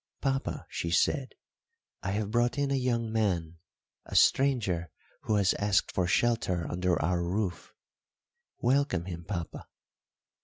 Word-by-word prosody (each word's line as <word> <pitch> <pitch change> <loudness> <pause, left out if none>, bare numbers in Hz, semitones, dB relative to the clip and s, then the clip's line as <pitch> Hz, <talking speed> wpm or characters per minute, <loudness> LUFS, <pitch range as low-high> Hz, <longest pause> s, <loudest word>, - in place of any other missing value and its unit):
"Papa," 135 -1 -2
she 85 - -3
said, 130 - +1 0.7
"I 100 - -3
have 105 0 -2
brought 120 +2 +1
in 140 -1 0
a - - +2
young 120 -3 0
man 90 -7 0 0.5
a - - -7
stranger 105 -11 +3 0.4
who 110 - +1
has 100 -2 +3
asked 105 -1 +2
for 90 -2 0
shelter 95 -5 +1
under 90 0 0
our 85 +2 +1
roof. 90 -1 -2 0.9
Welcome 125 - +1
him, 85 -2 -6
papa." 90 -5 -5
100 Hz, 130 wpm, -29 LUFS, 85-120 Hz, 0.9 s, stranger